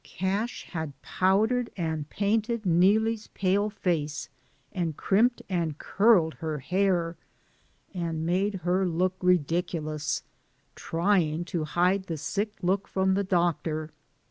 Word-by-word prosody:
Cash 200 +6 -2
had 160 -5 -5
powdered 220 +6 +2
and 160 -3 -2
painted 220 +2 0
Neelie' 195 +6 +4
s 210 - -16
pale 200 +2 +1
face 160 -7 -2 0.4
and 170 -5 -2
crimped 235 +5 +2
and 170 -5 -1
curled 195 -6 +3
her 155 -2 -2
hair 175 +2 0 0.4
— - - -37
and 165 -3 -3
made 190 +4 +1
her 185 +1 +2
look 180 +2 +1
ridiculous 165 -3 0 0.3
— - - -41
trying 170 -2 +1
to 170 -2 -2
hide 180 +4 +1
the 165 -3 -4
sick 205 +8 -2
look 195 +2 +1
from 190 0 +1
the 200 +1 +1
doctor. 170 -4 0
180 Hz, 130 wpm, -27 LUFS, 165-200 Hz, 0.4 s, Neelie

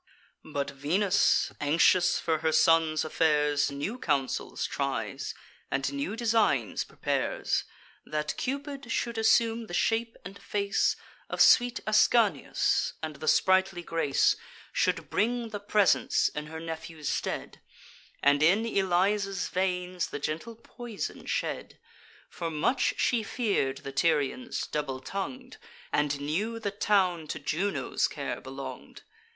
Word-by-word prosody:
But 140 -2 -3
Venus, 180 +9 +2
anxious 165 +4 +4
for 160 -2 0
her 160 0 +1
son's 155 -1 +3
affairs, 150 -2 +2
New 145 - -4
counsels 140 - -1
tries, - - -3 0.3
and 135 +1 -1
new 140 +9 -3
designs 220 - +1
prepares: - - -1 0.4
That 150 0 -3
Cupid 280 -2 -4
should 235 -1 -1
assume 225 0 +3
the 175 - -5
shape 225 +3 0
and 195 +2 -9
face 200 -1 0 0.3
Of - - -4
sweet 245 0 +5
Ascanius, 215 +1 +2
and 155 -2 -4
the 155 - -7
sprightly 190 0 +3
grace; 165 -5 +2 0.4
Should 165 -5 0
bring 235 +2 0
the 210 -1 -5
presents, 205 -1 +2
in 150 0 -6
her 160 +1 -7
nephew's 160 -2 -6
stead, - - -3 0.6
And 145 +1 +4
in 195 +9 +4
Eliza's 195 -1 +1
veins 180 -1 -1
the - - -5
gentle 160 +11 -4
poison 230 -1 -7
shed: - - -3 0.5
For 170 -1 -5
much 165 - +1
she 240 -2 +2
fear'd 205 - -1
the 135 - -5
Tyrians, 155 - 0
double 140 -3 -3
tongued, 250 - -6 0.4
And 145 -1 +1
knew 190 +11 -2
the 210 -3 -3
town 190 -5 +1
to 155 - -4
Juno's 180 +8 -1
care - - -5
belong'd. - - -9
180 Hz, 125 wpm, -28 LUFS, 150-215 Hz, 0.6 s, sweet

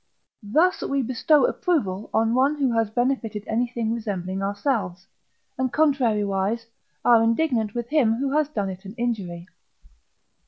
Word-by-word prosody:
Thus, 315 - +2
we 275 -1 -1
bestow 255 +4 +3
approval 215 - -1
on 225 +1 +2
one 270 +4 +3
who 275 -4 +1
has 225 -2 +1
benefited 235 -3 -1
anything 235 0 -1
resembling 195 -4 -4
ourselves, 200 -3 -2 0.5
and, 260 -1 0
contrariwise, 230 -7 +1 0.4
are 235 -2 +6
indignant 230 -2 +1
with 240 0 -3
him 255 -8 +3
who 270 +3 -2
has 305 -1 +2
done 205 -9 -2
it 185 +1 -10
an 195 +2 -10
injury. 195 -8 -3
230 Hz, 135 wpm, -24 LUFS, 205-265 Hz, 0.5 s, are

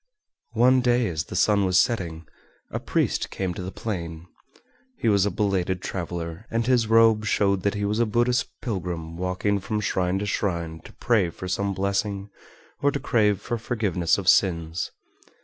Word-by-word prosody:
One 125 +3 +5
day 120 -1 +2
as 80 -4 -3
the - - -8
sun 105 -1 +3
was 90 -1 +2
setting, 85 -7 0 0.5
a - - -2
priest - - 0
came 95 -2 -3
to 90 - -6
the 90 +1 -5
plain. 85 -7 -5 0.7
He - - -2
was 100 -2 +4
a - - +2
belated 95 -3 0
traveler, 85 +1 -5
and 115 0 0
his 125 -3 +3
robe 115 -1 +5
showed 100 -2 +2
that 100 +2 0
he 100 0 -1
was 105 +2 0
a 120 - +3
Buddhist 120 +4 +1 0.2
pilgrim 85 -7 -4
walking 90 +3 -1
from 105 +2 -2
shrine 95 -2 0
to 100 - -2
shrine 85 -5 -2
to - - -12
pray 110 -7 +1
for 95 - -8
some 100 +2 -1
blessing 100 +1 -2 0.5
or 145 - +4
to 140 - -2
crave 105 -7 +2
for 120 +2 -3
forgiveness 100 -8 0
of 100 -3 -5
sins. 85 -4 +2
100 Hz, 175 wpm, -25 LUFS, 90-110 Hz, 0.7 s, One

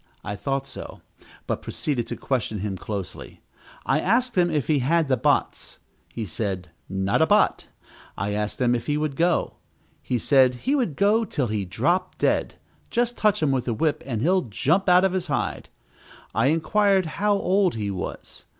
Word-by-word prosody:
I 105 - -4
thought 135 +5 -2
so, - - -9 0.4
but - - -2
proceeded 130 -6 -3
to - - -4
question 110 -6 -2
him 100 -2 -3
closely. 100 -1 -7 0.4
I - - +2
asked 240 +5 +1
him 175 -2 +3
if 150 -5 0
he 150 -3 +2
had 160 +5 +2
the 130 - +4
bots. 115 - 0 0.3
He 115 - -4
said, 95 -2 -4 0.2
not 95 0 0
a - - +4
bot. - - +3 0.5
I 100 +2 -2
asked 105 0 -3
him 125 -1 +3
if 120 -1 -2
he 150 0 +1
would 150 -2 -2
go. 170 +3 +1 0.4
He 125 - -1
said 130 +1 +4
he 270 - +2
would 245 - 0
go 210 +6 +3
till 145 - -2
he 105 -2 -2
dropped 170 - 0
down - - +3
dead; - - -6 0.3
just 240 0 0
touch 210 -6 +2
him 145 - +3
with 130 -2 -1
a 120 - +1
whip, 150 +6 0
and 115 -4 -2
he'll 185 +3 +3
jump 165 - 0
out 180 +1 +6
of 190 -1 +2
his 185 -2 -2
hide. 140 -4 -2 0.6
I 115 +3 +2
inquired 190 +5 +2
how 205 +6 0
old 190 - +2
he 105 -3 -2
was. 95 - -7
145 Hz, 185 wpm, -24 LUFS, 110-185 Hz, 0.6 s, out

